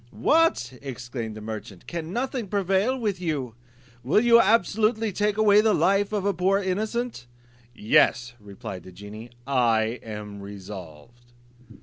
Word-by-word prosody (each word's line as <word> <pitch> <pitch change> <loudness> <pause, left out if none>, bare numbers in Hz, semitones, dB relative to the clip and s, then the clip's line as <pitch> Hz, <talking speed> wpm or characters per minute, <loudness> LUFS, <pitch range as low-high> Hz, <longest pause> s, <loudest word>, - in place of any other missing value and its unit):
"What!" 305 - +2
exclaimed 120 -4 -6
the - - -8
merchant, 105 -3 -8
"can 170 -1 -5
nothing 245 0 -2
prevail 200 +5 +1
with 205 -6 -2
you? 145 -9 -2 0.5
Will 145 - +3
you 235 0 +6
absolutely 220 +1 +2
take 210 +2 0
away 210 -1 +6
the 220 -1 +3
life 200 +1 +2
of 205 -2 -1
a 200 - +2
poor 190 +3 +2
innocent?" 210 - -2 0.5
"Yes," 120 +2 +3
replied 100 -2 -8
the 95 - -13
genie, 105 +5 -10 0.2
"I 120 -4 +1
am 105 -2 -8
resolved." 100 +3 -11
145 Hz, 135 wpm, -25 LUFS, -, 0.5 s, you